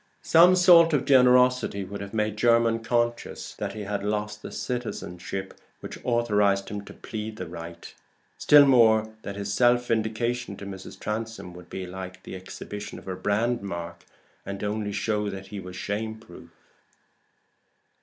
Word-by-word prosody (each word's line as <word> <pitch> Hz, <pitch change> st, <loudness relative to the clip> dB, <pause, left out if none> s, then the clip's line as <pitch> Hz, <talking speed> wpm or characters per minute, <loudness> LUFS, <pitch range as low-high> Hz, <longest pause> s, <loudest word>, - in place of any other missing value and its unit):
Some 175 Hz, +3 st, +6 dB
salt 170 Hz, -2 st, +7 dB
of 140 Hz, -2 st, +1 dB
generosity 125 Hz, -5 st, +4 dB
would 100 Hz, +2 st, -7 dB
have 100 Hz, 0 st, -7 dB
made 105 Hz, -1 st, -1 dB
Jermyn 115 Hz, +1 st, +3 dB
conscious 120 Hz, -, -2 dB
that -, -, -5 dB
he 110 Hz, -, -6 dB
had 100 Hz, -1 st, -3 dB
lost 105 Hz, 0 st, -2 dB
the -, -, -8 dB
citizenship 95 Hz, -6 st, -5 dB, 0.3 s
which -, -, -8 dB
authorized 105 Hz, -5 st, +1 dB
him 105 Hz, 0 st, -5 dB
to -, -, -11 dB
plead 110 Hz, 0 st, -6 dB
the 90 Hz, -, -6 dB
right; 85 Hz, 0 st, -9 dB, 0.5 s
still 145 Hz, -1 st, +7 dB
more, 110 Hz, -4 st, +4 dB
that 100 Hz, -, -6 dB
his 100 Hz, 0 st, -4 dB
self 120 Hz, +2 st, +3 dB
vindication 115 Hz, -1 st, -1 dB
to 100 Hz, -, -8 dB
Mrs. 95 Hz, -1 st, -9 dB
Transome 110 Hz, -4 st, -5 dB
would 90 Hz, -1 st, -13 dB
be 95 Hz, -, -5 dB
like 95 Hz, 0 st, -8 dB
the -, -, -8 dB
exhibition 100 Hz, +2 st, -8 dB
of -, -, -13 dB
a 95 Hz, -, -3 dB
brand 110 Hz, +6 st, 0 dB
mark, 85 Hz, -3 st, -6 dB, 0.4 s
and 100 Hz, 0 st, -6 dB
only 105 Hz, 0 st, -2 dB
show 105 Hz, 0 st, -1 dB
that 95 Hz, -1 st, -8 dB
he 105 Hz, -, -6 dB
was 90 Hz, -1 st, -9 dB
shame 110 Hz, +4 st, -3 dB
proof. 85 Hz, -5 st, -14 dB
105 Hz, 160 wpm, -26 LUFS, 100-120 Hz, 0.5 s, salt